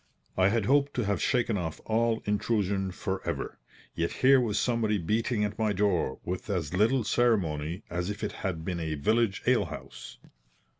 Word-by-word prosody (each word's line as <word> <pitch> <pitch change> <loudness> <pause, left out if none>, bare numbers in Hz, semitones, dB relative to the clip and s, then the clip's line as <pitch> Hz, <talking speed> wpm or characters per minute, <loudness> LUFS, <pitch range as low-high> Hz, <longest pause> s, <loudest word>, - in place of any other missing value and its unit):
I 95 0 +4
had 110 0 +1
hoped 140 +3 +2
to 125 - 0
have 100 -3 0
shaken 115 -5 +1
off 80 -3 -4
all 115 0 +1
intrusion 100 -2 0
for 95 +1 -4
ever, - - -4 0.3
yet 85 0 -1
here 130 0 +5
was 110 -4 -1
somebody 115 -4 +1
beating 110 +5 0
at 105 +1 -3
my 110 -2 +1
door 90 -9 +1
with 90 +4 -4
as 85 -5 -2
little 115 +7 +3
ceremony 95 -7 +1
as 90 +2 -3
if 105 +1 -5
it 105 - -1
had 90 -6 -4
been 90 -1 -2
a 80 -1 -2
village 110 +7 +1
ale - - +3
house. - - -9
105 Hz, 180 wpm, -28 LUFS, 90-115 Hz, 0.3 s, here